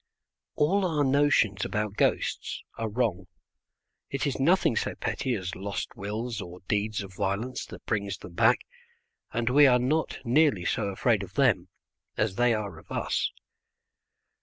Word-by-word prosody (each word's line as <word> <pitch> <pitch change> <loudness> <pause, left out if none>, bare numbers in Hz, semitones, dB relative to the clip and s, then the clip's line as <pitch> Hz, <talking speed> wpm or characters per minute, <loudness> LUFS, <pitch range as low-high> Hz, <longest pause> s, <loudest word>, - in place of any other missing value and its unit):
All 190 +7 +2
our 160 -5 +1
notions 135 -8 +3
about 105 -1 -2
ghosts - - 0
are 115 -1 -3
wrong. 105 -6 -1 0.8
It 140 +1 -2
is 140 - -1
nothing 165 -3 +3
so - - -1
petty 130 -2 -2
as 90 -3 -4
lost 100 +4 -4
wills 110 +2 -4
or 90 0 -9
deeds 105 0 0
of 95 -1 -10
violence 100 +7 -2
that - - -11
brings 100 -3 -1
them 90 - -11
back, - - +4 0.7
and 115 0 -2
we 145 +2 +7
are 125 -1 +5
not 140 +6 0
nearly 125 - +3
so 110 +2 0
afraid 100 - +1
of - - -9
them - - +3 0.5
as - - +1
they 120 +4 +3
are 105 -3 -2
of - - -19
us. - - 0
115 Hz, 155 wpm, -28 LUFS, 100-135 Hz, 0.8 s, we